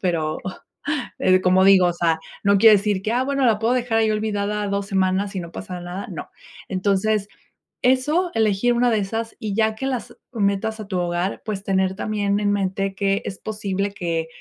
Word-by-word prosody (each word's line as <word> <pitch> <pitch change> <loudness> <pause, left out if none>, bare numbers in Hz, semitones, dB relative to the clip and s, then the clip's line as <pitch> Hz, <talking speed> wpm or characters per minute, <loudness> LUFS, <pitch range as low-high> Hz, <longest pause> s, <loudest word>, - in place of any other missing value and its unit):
pero, 160 -4 0 0.8
eh, 185 0 +4
como 185 +1 +4
digo, 190 -2 +6
o 175 - 0
sea, 165 -2 +1 0.2
no 200 0 +4
quiere 215 +1 +8
decir 200 -1 -1
que, 215 +3 -2
ah, 250 +2 +1
bueno, 275 -1 0
la 220 -3 +3
puedo 230 +3 +2
dejar 245 -2 0
ahí 220 -1 +3
olvidada 210 -1 -1
2 200 0 -1
semanas 195 0 0
y - - -1
no 170 -1 -7
pasa 185 -1 -7
nada. 175 +3 -6
No, - - -7 0.4
entonces, 200 +2 +1 0.5
eso 295 +8 +2
elegir 220 +2 +2
una 245 +1 +3
de 220 - +2
esas 225 +3 -4
y 215 -4 -3
ya 220 0 +2
que 265 - -5
las 255 -3 -4 0.2
metas 215 +1 0
a 210 - -8
tu 185 -3 -2
hogar, 175 +2 -2
pues 205 -3 -4
tener 190 -1 +1
también 205 -1 -1
en 205 -1 +2
mente 195 -1 -1
que 195 0 0
es 190 - -6
posible 200 -2 -3
que 165 -4 -2
200 Hz, 195 wpm, -22 LUFS, 190-220 Hz, 0.8 s, quiere